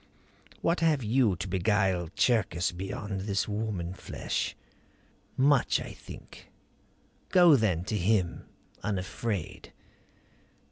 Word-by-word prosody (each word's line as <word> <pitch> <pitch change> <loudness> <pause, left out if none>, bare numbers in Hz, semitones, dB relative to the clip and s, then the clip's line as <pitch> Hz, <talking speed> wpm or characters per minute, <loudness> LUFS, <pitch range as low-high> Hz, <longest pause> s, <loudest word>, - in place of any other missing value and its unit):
What 170 +1 +1
have 155 -5 +2
you 110 -2 +3
to 90 - -5
beguile 95 -2 +1
Cherkis 95 -9 +2
beyond 95 +2 -5
this 100 0 -1
woman 105 -5 -3
flesh? - - -3 0.8
Much, 135 -1 +3
I - - -7
think. - - -12 0.8
Go 175 -4 +7
then 100 -9 +1
to 105 - -3
him 95 -2 0 0.3
unafraid." 100 0 -3
105 Hz, 100 wpm, -29 LUFS, 90-115 Hz, 0.8 s, Go